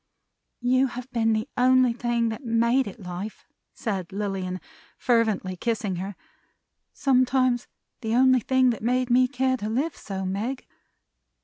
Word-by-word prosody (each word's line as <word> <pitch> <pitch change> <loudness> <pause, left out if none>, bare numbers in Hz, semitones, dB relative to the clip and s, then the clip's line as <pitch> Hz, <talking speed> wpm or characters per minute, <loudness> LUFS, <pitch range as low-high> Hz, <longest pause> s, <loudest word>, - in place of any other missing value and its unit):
"You 255 +2 +3
have 250 0 -7
been 225 -2 +2
the 220 +3 -1
only 255 -1 +4
thing 235 -1 0
that 220 +5 -6
made 235 +2 +2
it 205 +4 -9
life," 180 +2 -7 0.3
said 195 -6 -3
Lilian, 190 -2 -3 0.4
fervently 220 -6 +1
kissing 210 -2 -2
her; 195 +2 -5 0.8
"sometimes 255 -2 +2 0.3
the 225 -2 -1
only 260 0 +5
thing 260 +1 +3
that 230 - -5
made 250 +2 0
me 255 +1 +5
care 260 0 0
to 210 -2 -4
live 280 +8 -1
so, 190 -2 -5
Meg. 220 +8 -3
235 Hz, 140 wpm, -25 LUFS, 210-255 Hz, 0.8 s, only